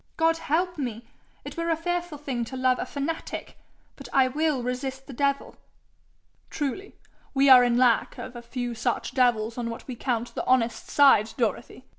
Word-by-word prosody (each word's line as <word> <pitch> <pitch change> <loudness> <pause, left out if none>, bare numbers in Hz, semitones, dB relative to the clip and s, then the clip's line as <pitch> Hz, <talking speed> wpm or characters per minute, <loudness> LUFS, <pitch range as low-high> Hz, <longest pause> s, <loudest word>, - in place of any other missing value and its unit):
God 325 0 +3
help 345 +2 -1
me! 240 -4 -4 0.4
it - - -7
were 335 0 -2
a 330 - +3
fearful 350 -1 -3
thing 265 -5 -3
to 260 +3 -7
love 255 0 +2
a - - -3
fanatic! 295 +3 -5 0.4
But - - -11
I 265 -1 +4
will 295 -2 0
resist 265 +2 -4
the 270 - -10
devil.' 280 +2 -1 0.9
'Truly 300 +7 -4 0.4
we 275 +1 +5
are 255 -1 +9
in 240 -1 +2
lack 245 -2 +3
of 255 - -8
a 240 - -7
few 245 0 -4
such 240 +1 -2
devils 235 -2 +1
on 235 -1 -2
what 230 - -8
we 255 - -5
count 240 -1 -2
the - - -3
honest 235 -3 +1
side, 245 -7 +5
Dorothy!' 240 +2 -2
255 Hz, 180 wpm, -26 LUFS, 240-290 Hz, 0.9 s, are